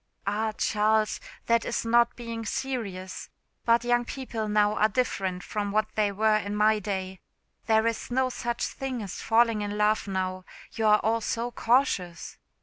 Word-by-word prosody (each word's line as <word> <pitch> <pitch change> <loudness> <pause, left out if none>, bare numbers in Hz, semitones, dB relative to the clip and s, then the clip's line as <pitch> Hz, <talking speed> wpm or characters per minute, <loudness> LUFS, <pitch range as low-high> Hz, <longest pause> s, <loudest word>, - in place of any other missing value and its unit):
"Ah! 215 +2 0
Charles, 215 0 +1 0.3
that 230 0 +3
is 235 - -2
not 235 +1 +3
being 230 -1 -6
serious. 210 -7 -4 0.4
But 235 0 +4
young 240 0 +2
people 240 -4 -4
now 210 0 +3
are 215 - +3
different 190 -6 -1
from 205 -1 -3
what 215 +1 0
they 210 -2 +1
were 215 +2 +3
in 205 -1 -3
my 215 +1 +3
day. 190 -2 -4 0.5
There 220 0 +4
is 230 -1 -2
no 260 +1 +1
such 240 -1 -2
thing 260 -4 -4
as 195 - -6
falling 225 -1 +3
in 205 0 -3
love 210 0 +2
now, 185 -1 -2 0.3
you 225 -2 0
are 210 0 +5
all 225 +1 +1
so 235 +2 -2
cautious." 230 -9 0
215 Hz, 165 wpm, -27 LUFS, 205-235 Hz, 0.5 s, are